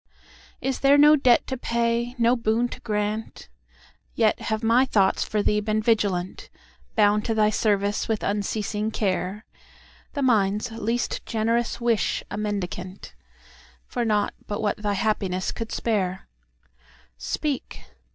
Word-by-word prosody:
Is 265 0 -2
there 280 +1 +5
no 300 +1 +7
debt 255 -4 +4
to 260 - -3
pay, 235 0 -1
no 235 +1 +3
boon 230 0 +1
to - - -8
grant? 210 0 -3 0.7
Yet 220 -2 +2
have 220 0 -3
my 230 +3 +4
thoughts 200 -7 +2
for 210 -1 -1
thee 210 - +2
been 215 0 0
vigilant, 205 -5 0 0.5
Bound 210 -1 +4
to 225 - 0
thy 215 -1 +3
service 205 -1 0
with 220 -2 -1
unceasing 210 +1 -1
care—The 205 +7 -5
mind's 210 -2 +2
least 230 +2 -2
generous 230 +1 0
wish 235 -3 0
a - - -3
mendicantFor 195 -3 -4 0.9
nought 210 -2 +1
but 205 - -3
what 210 -2 0
thy 210 -1 -1
happiness 195 -2 -1
could 230 -1 -6
spare. 190 -5 -1 0.9
Speak! 270 - -3
215 Hz, 130 wpm, -24 LUFS, 205-235 Hz, 0.9 s, no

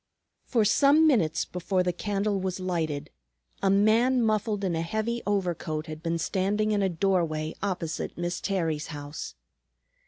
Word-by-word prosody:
For 225 -3 +2
some 285 +8 +5
minutes 170 - +2
before 180 +1 -1
the 180 -1 0
candle 200 +2 -1
was 185 0 -3
lighted, 160 -5 -2 0.5
a 195 - +2
man 225 +6 +4
muffled 215 -1 0
in 180 -3 0
a 165 - -1
heavy 220 +7 -2
overcoat 175 -6 -1
had 155 -1 -8
been 170 0 -1
standing 200 +5 0
in 205 -1 +1
a 195 - +2
doorway 165 -4 0
opposite 185 -5 -3
Miss 175 0 -3
Terry's 165 -6 -1
house. 145 - -7
185 Hz, 150 wpm, -27 LUFS, 165-210 Hz, 0.5 s, some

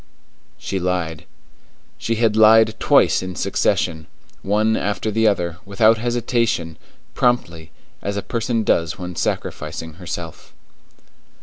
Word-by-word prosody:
She 95 - -4
lied. 90 -3 -2 0.7
She 115 - -1
had 110 -1 +1
lied 110 0 +6
twice - - +4
in 90 -1 -6
succession, 80 -2 0 0.3
one 110 +3 +1
after 105 +1 -2
the 110 +1 +2
other, 85 -5 0
without 110 +3 +3
hesitation, 115 -8 -1 0.4
promptly, 85 -10 0 0.3
as 100 0 -3
a 100 - -3
person 115 -1 -1
does 85 -6 +1
when 90 -1 -7
sacrificing 80 0 -4
herself. 85 -2 -7
100 Hz, 115 wpm, -20 LUFS, 85-110 Hz, 0.7 s, lied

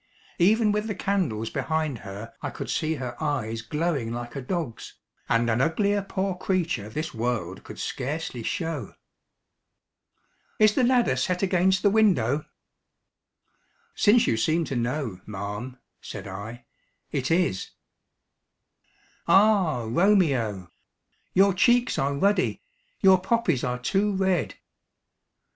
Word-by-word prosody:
Even 210 +4 +4
with 210 +1 -1
the 210 - -3
candles 155 - -1
behind 155 -1 -1
her 100 +4 -8
I - - -3
could - - -6
see 160 0 0
her 125 -3 -5
eyes 115 -7 -2
glowing 145 -1 -2
like 120 +1 -6
a 140 - -3
dog's, 145 -4 -4 0.3
and 115 +1 +2
an 115 +2 +1
uglier 200 +7 +1
poor 195 0 -2
creature 175 - -1
this 155 +8 -4
world 110 -6 -3
could - - -10
scarcely 140 -2 -4
show. 155 - -3 1.6
"Is 215 -1 +5
the 255 - +2
ladder 245 - +3
set 180 +8 -1
against 190 0 +2
the 205 - +4
window?" 155 - +2 1.5
"Since 225 +3 +4
you 115 - +1
seem 160 +8 +1
to 135 - -4
know, 120 -5 -2
ma'am," 105 +5 -6 0.2
said - - -8
I, 110 +5 -8 0.5
"it 135 -3 -1
is." 165 - +1 1.6
"Ah, 190 - +4
Romeo! 125 - +2 0.6
Your 195 +1 +5
cheeks 240 +6 +3
are 140 +1 0
ruddy 200 - +1 0.4
your 190 -2 +6
poppies 230 - +1
are 125 0 -1
too 195 +10 0
red." 190 - 0
155 Hz, 125 wpm, -26 LUFS, 120-190 Hz, 1.6 s, your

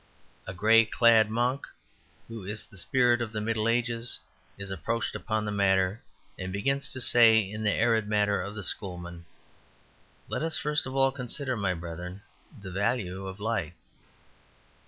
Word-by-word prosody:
A 95 - -5
grey 110 +5 +6
clad 115 -1 +4
monk, 120 +5 0 0.6
who 115 -3 -8
is 105 +3 -4
the - - -17
spirit 120 +5 +2
of 115 -2 -3
the 110 - -3
Middle 110 0 -1
Ages, 115 0 0 0.4
is 100 -1 -6
approached 105 +6 -2
upon 110 -1 -2
the 105 - -2
matter, 95 0 +2 0.4
and 95 0 -4
begins 135 +8 -1
to 130 - -5
say, 115 -2 +6
in 105 0 -1
the 105 - +2
arid 110 -1 +2
manner 105 -1 +1
of 100 +3 -6
the 100 - -6
Schoolmen, 90 -3 -5 1.0
"Let - - -3
us 160 0 0
first 150 -2 -1
of 130 - -6
all 135 0 +4
consider, 130 0 -3
my 100 -4 0
brethren, 85 +3 -7 0.4
the 95 - -7
value 95 -2 -1
of 95 +1 -8
Light. 100 -7 -2
110 Hz, 160 wpm, -28 LUFS, 95-120 Hz, 1.0 s, grey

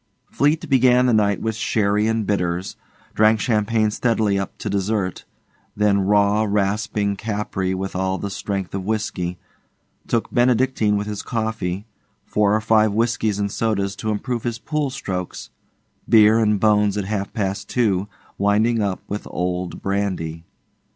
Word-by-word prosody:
Fleete 155 +4 +1
began 125 -2 +4
the 125 - +3
night 100 -2 +2
with 110 0 0
sherry 105 -1 +1
and 115 -1 0
bitters, 90 -2 -1 0.4
drank 110 +1 +4
champagne 110 -1 +1
steadily 110 -3 +1
up 100 - -5
to - - -6
dessert, 100 -1 -1 0.5
then 105 -1 +3
raw, 100 +2 +3
rasping 105 0 0
Capri 100 -3 -2
with 95 0 -4
all 95 +1 0
the 100 - -5
strength 100 -2 -4
of 95 -1 -3
whisky, 95 -4 -2 0.7
took 115 - -1
Benedictine 120 -3 +2
with 100 - -2
his 105 -1 -4
coffee, 110 -4 -3 0.4
four 105 0 +2
or 110 - +1
five 110 -1 +3
whiskies 110 -2 0
and 100 -1 -1
sodas 100 -3 -1
to 110 - -3
improve 115 +3 -2
his 120 -1 -3
pool 150 +1 -2
strokes, 95 -9 -5 0.6
beer 110 0 +6
and 105 -2 +2
bones 105 -1 +3
at 100 - -2
half 100 -1 -3
past 100 -3 -3
two, 100 -6 +1 0.3
winding 105 +3 +2
up 100 -2 -1
with 105 +1 -5
old 90 0 -3
brandy. 95 -5 -2
105 Hz, 150 wpm, -21 LUFS, 100-110 Hz, 0.7 s, beer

